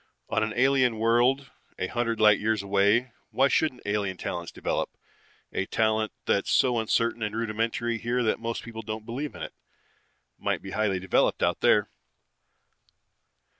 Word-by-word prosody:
On - - +1
an 110 0 0
alien 130 -2 +3
world 120 +5 +2 0.3
a - - -1
hundred 115 +3 -2
light 105 -2 +6
years 110 -1 0
away, 100 +5 +2 0.2
why 135 +1 +3
shouldn't 135 -5 0
alien 100 -2 -1
talents 85 -1 -4
develop? - - -2 0.6
A 95 - -1
talent 110 -1 +1
that's 100 - +1
so 125 -3 +3
uncertain 115 +1 0
and 105 0 -2
rudimentary 115 +1 -1
here 120 +2 0
that 110 - +1
most 115 0 -4
people 115 -1 -7
don't 110 0 -6
believe 135 +6 -5
it, - - -7 0.9
might - - -1
be - - -7
highly 105 -3 0
developed 95 - +1
out - - +1
there. - - +3
115 Hz, 150 wpm, -27 LUFS, 105-120 Hz, 0.9 s, light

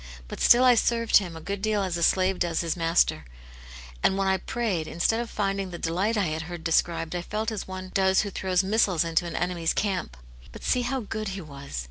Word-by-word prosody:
But - - -7
stilt 245 +2 +6
I 250 - +7
served 230 0 +3
Him 180 -5 -2
a - - -9
good 200 +3 -4
deal 210 -1 +1
as 185 -2 -2
a 170 - -3
slave 185 +2 +2
does 170 -2 0
his 165 -2 -2
master, 165 - +2 0.8
and 190 - +2
when 195 0 0
I 190 0 +3
prayed, 190 -6 -2
instead 195 +7 0
of 235 -1 -4
finding 195 -2 -2
the 175 - -7
delight 185 +8 -1
I 200 - +2
had 155 -1 -2
heard 175 -2 -7
described, 165 0 0
I 175 - -1
felt 215 +5 -3
as 210 -3 -5
one 185 0 -7
does 190 -1 +3
who 205 - -4
throws 185 0 0
missiles 190 -4 +2
into 165 +1 0
an 170 - -6
enemy's 175 -2 -1
camp. 190 - -2 0.3
But - - -11
see 250 - +2
how 255 +2 -2
good 215 0 -5
He - - -6
was. 140 - -8
190 Hz, 225 wpm, -26 LUFS, 170-210 Hz, 0.8 s, I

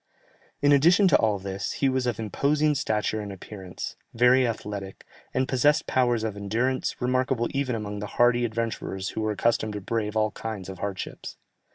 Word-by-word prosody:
In 145 - +5
addition 170 +8 +6
to - - +6
all 110 -3 +2
this, 95 0 -4
he 140 - +1
was 130 -1 0
of 120 -3 -1
imposing 145 +8 +1
stature 110 -5 -1
and 100 -1 -6
appearance, 95 -1 -7 0.2
very 125 +2 +5
athletic, 105 -3 -5 0.3
and 130 0 0
possessed 145 +5 +3
powers 120 -3 +1
of 110 -2 -2
endurance, 115 +6 -1
remarkable 125 -1 +1
even 135 -3 -1
among 105 -2 -4
the 105 - -4
hardy 120 0 +4
adventurers 110 -4 -3
who - - -4
were 110 0 0
accustomed 110 0 +1
to 105 - -5
brave 110 +1 -2
all 110 0 +2
kinds 105 -5 -6
of 95 -1 -8
hardships. 100 -2 -5
115 Hz, 175 wpm, -26 LUFS, 105-130 Hz, 0.3 s, addition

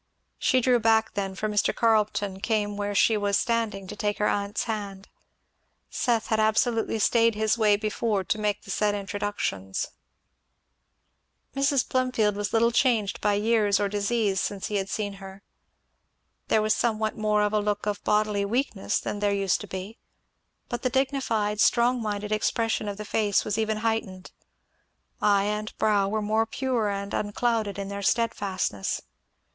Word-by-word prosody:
She 255 - +3
drew 250 0 +3
back 225 0 +2
then, 195 -1 -3
for 215 - -2
Mr. 210 -1 +1
Carleton 210 -4 +1
came 205 -1 -1
where 205 0 -3
she 220 - +4
was 205 -1 +1
standing 225 -4 -1
to - - -8
take 205 0 -1
her 210 - +1
aunt's 200 +1 -1
hand; 200 -3 -5 0.8
Seth 230 -3 0
had 220 - +1
absolutely 225 +1 +1
stayed 230 +1 +3
his 215 +1 +1
way 215 -3 +4
before 210 -1 -1
to 215 - -1
make 210 -1 -1
the 195 - -8
said 205 +1 +1
introductions. 195 - -3 1.7
Mrs. 275 -1 +2
Plumfield 250 -5 +1
was 205 0 -3
little 230 +1 +3
changed 230 -6 +1
by 205 -1 +2
years 210 -1 +2
or 205 - +1
disease 205 -1 0
since 200 -2 -3
he 210 - -1
had 195 0 -2
seen 205 -1 -3
her. 195 +1 -10 1.0
There 215 - +3
was 215 0 +3
somewhat 220 -2 0
more 210 -1 +1
of 210 0 0
a 215 - +3
look 205 0 -1
of 205 -1 -3
bodily 210 -1 +1
weakness 225 -1 -1
than 205 - -4
there 205 0 +1
used 195 -2 +1
to 205 - -8
be; 190 +4 -7 0.7
but 240 - -4
the 255 - 0
dignified, 235 -6 0
strong 245 +1 +3
minded 210 -1 -3
expression 220 0 0
of 200 -1 -4
the 210 - -6
face 210 -2 +1
was 210 +1 -1
even 220 -1 0
heightened; 220 -5 -2 0.9
eye 200 -1 +4
and 210 +1 -3
brow 205 -2 +2
were 215 +1 -1
more 220 +2 +1
pure 245 -3 -1
and 200 0 -4
unclouded 210 -1 -1
in 200 -1 -4
their 200 0 -5
steadfastness. 195 - -1
210 Hz, 165 wpm, -26 LUFS, 200-225 Hz, 1.7 s, she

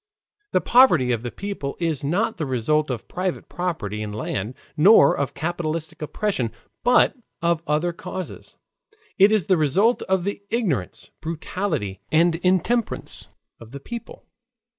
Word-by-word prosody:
The - - +2
poverty 175 - +5
of 115 -2 0
the 120 - -4
people 195 -5 -5
is 165 -5 -1
not 195 +10 0
the 160 - -2
result 140 +5 +1
of 120 -4 -4
private 180 0 -3
property 160 - -3
in 105 -1 -4
land, 105 +2 -4 0.2
nor 165 -2 +6
of 140 - -2
capitalistic 160 -1 -3
oppression, 150 - -1 0.3
but 245 +1 +4 0.3
of 170 -1 +2
other 155 +4 +1
causes: 185 +2 -7 0.6
it 200 +2 +7
is 215 -6 +2
the 185 - +3
result 190 - +3
of 190 -2 +2
the 200 +1 -3
ignorance, 170 - -2
brutality, 160 - -3
and 165 +1 +4
intemperance 190 +6 -1 0.3
of 115 +1 -13
the 140 - -6
people. 235 - -9
165 Hz, 140 wpm, -23 LUFS, 140-190 Hz, 0.6 s, it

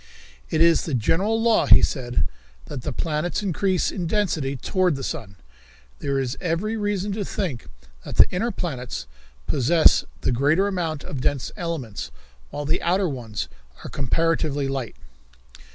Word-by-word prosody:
"It 155 - 0
is 170 -1 +5
the 155 - -1
general 190 - +1
law," 225 -1 +3
he - - +8
said, 125 -4 0 0.4
"that 135 - -6
the 145 - -3
planets 160 - -1
increase 190 0 +1
in 175 -3 -3
density 160 -9 0
toward 180 - +1
the 135 - -5
sun. 115 -12 -5 0.6
There 140 -1 -1
is 130 -1 -2
every 180 +5 -1
reason 205 -2 -1
to 205 +1 -2
think 170 - -3 0.4
that - - -7
the - - +8
inner 210 +7 0
planets 130 - -4 0.4
possess 155 - +4 0.2
the - - +1
greater 145 +10 +3
amount 165 -6 -2
of 135 - -5
dense 135 -1 0
elements, 145 - -4 0.4
while 145 - -5
the 155 +4 0
outer 185 +2 +2
ones 115 - -4 0.4
are - - -7
comparatively 145 0 +1
light." 135 -4 -3
160 Hz, 150 wpm, -24 LUFS, 135-185 Hz, 0.6 s, he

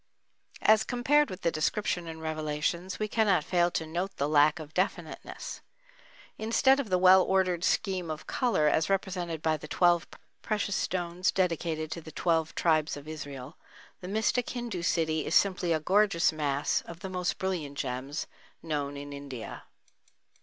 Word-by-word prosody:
As 215 0 +6
compared 290 +4 +2
with 185 0 -7
the 170 - +1
description 175 +2 -1
in 160 0 -7
Revelations 155 +3 -2
we 215 - -1
cannot 205 -7 +2
fail 175 +1 +2
to 160 - -2
note 175 +5 -4
the 140 - 0
lack 150 +1 +4
of 155 -1 -9
definiteness. 180 -3 -3 0.8
Instead 265 +5 +3
of 260 -7 -3
the 185 - +3
well 185 +1 +7
ordered 185 -2 +1
scheme 185 -4 0
of 155 -1 -5
color 235 -12 +1
as 155 +3 +2
represented 180 -4 -2
by 160 -1 +2
the 150 - -10
twelve 175 +1 +3 0.3
precious 210 -2 -1
stones 175 0 -1
dedicated 165 -4 -1
to 170 - -4
the 160 - -11
twelve 165 -2 0
tribes 155 -3 +2
of 145 +1 -11
Israel, 145 -2 -7 0.4
the 180 - -8
mystic 220 +4 0
Hindu 240 -7 -4
city 160 -2 +1
is 165 - -1
simply 185 -3 +3
a 160 - +2
gorgeous 185 +1 +3
mass 145 -2 0
of 170 +1 -10
the 190 - -4
most 180 -1 -2
brilliant 165 -7 -3
gems 135 +3 -3 0.4
known 145 -3 -3
in 145 0 -7
India. 140 -5 -8
170 Hz, 160 wpm, -29 LUFS, 155-190 Hz, 0.8 s, well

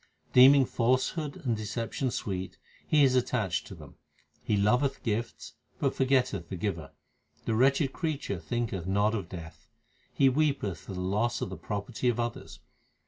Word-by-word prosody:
Deeming 135 +2 +8
falsehood 130 +6 0
and 120 -3 +1
deception 115 +4 -3
sweet 95 -5 -4 0.3
he 150 -2 +4
is 130 -2 +4
attached 110 -7 0
to - - -9
them. - - -14 0.5
He 105 - +1
loveth 125 +7 +1
gifts 115 +1 -3 0.2
but - - 0
forgetteth 130 -10 +1
the - - -4
Giver. 85 -5 -4 0.5
The 115 - 0
wretched 135 +4 +3
creature 150 - -3
thinketh 95 0 -3
not 100 +3 +2
of 100 -6 -3
death. 80 -3 -10 0.4
He 135 - +3
weepeth 135 - +1
for 95 - -9
the 90 - -4
loss 105 +6 0
of - - -3
the - - -4
property 105 +7 -2
of 120 - -1
others. 120 0 -4
115 Hz, 155 wpm, -29 LUFS, 95-130 Hz, 0.5 s, Deeming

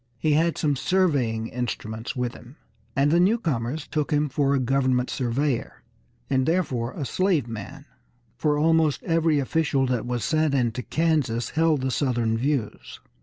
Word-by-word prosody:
He 155 +4 +1
had 165 +2 +2
some 145 -2 +1
surveying 135 -9 +1
instruments 115 -2 -4
with 125 -2 -2
him, 125 +3 -14 0.4
and 140 +1 +3
the 170 - +4
newcomers 160 - 0
took 150 -2 -2
him 150 -1 +1
for 140 +1 +1
a - - +2
government 130 -1 +1
surveyor 130 +1 -2 0.4
and 130 -2 +1
therefore 135 -9 0
a 145 - -4
slave 180 - +1
man, 120 +6 -8 0.5
for 150 +3 +1
almost 160 -1 +2
every 165 -2 +2
official 140 -1 +1
that 125 -2 -1
was 120 -2 -2
sent 155 +4 +1
into 120 -1 0
Kansas 150 -7 0
held 160 -2 +2
the 130 0 -1
Southern 120 -5 0
views. 130 -2 -2
140 Hz, 155 wpm, -25 LUFS, 125-155 Hz, 0.5 s, the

